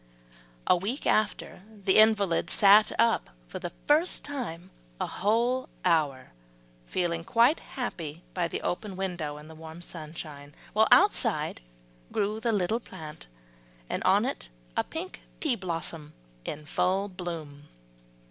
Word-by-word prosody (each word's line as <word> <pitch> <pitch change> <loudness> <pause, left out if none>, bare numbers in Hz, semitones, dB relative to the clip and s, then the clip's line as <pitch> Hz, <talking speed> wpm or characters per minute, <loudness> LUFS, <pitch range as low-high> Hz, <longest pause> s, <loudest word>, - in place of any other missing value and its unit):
A - - +5
week 205 +10 -3
after, 215 -3 0
the 200 -2 +2
invalid 205 -6 +4
sat 205 +1 +6
up 230 0 +3 0.2
for - - -6
the 175 - -4 0.2
first 310 +5 +3
time 190 - -5 0.3
a - - 0
whole 235 +6 +1 0.2
hour, 150 -7 +1 0.6
feeling 170 -2 -1
quite 235 - +4
happy 170 - -5
by 175 -2 0
the - - -4
open 195 +2 -2
window 175 -6 -3
in 150 +1 -11
the 160 - -11
warm 160 +1 -10
sunshine, 155 -4 -8 0.2
while - - +5
outside - - +4 0.5
grew 210 +2 0
the 230 +1 0
little 210 +2 +1
plant, 155 - -10 0.6
and - - -1
on - - +4
it - - -3 0.3
a - - +2
pink 345 +4 -7 0.2
pea 290 -7 +1
blossom 165 -5 -4 0.3
in 150 0 -5
full 185 +6 +1
bloom. 165 -6 -7
180 Hz, 135 wpm, -28 LUFS, 160-215 Hz, 0.6 s, sat